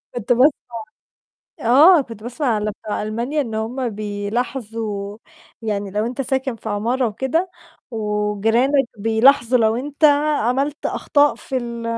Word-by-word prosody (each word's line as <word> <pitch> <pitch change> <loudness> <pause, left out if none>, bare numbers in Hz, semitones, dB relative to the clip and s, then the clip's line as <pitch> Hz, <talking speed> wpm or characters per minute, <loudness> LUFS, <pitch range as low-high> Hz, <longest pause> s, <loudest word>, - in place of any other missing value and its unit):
كنت 240 +1 -3
باسمع 260 +5 +6 1.1
آه، 295 +9 +6
كنت 230 -5 -9
باسمع 250 +5 -4
على 215 -2 0
بتوع 210 -1 -3
ألمانيا 235 +8 -2
إن 230 -5 -4
هم 240 +3 -2
بيلاحظوا 210 0 -4 0.4
يعني 205 -2 -3
لو 210 +3 -1
أنت 250 +3 -5
ساكن 265 -1 -2
في 220 - -8
عمارة 235 +5 0
وكده 295 - -1 0.4
وجيرانك 220 +5 +1
بيلاحظوا 235 +3 +4
لو 220 0 +2
أنت 290 +4 -3 0.4
عملت 275 +5 -1
أخطاء 290 0 +2
في 265 - -5
ال 235 -1 -4
235 Hz, 130 wpm, -20 LUFS, 215-265 Hz, 1.1 s, باسمع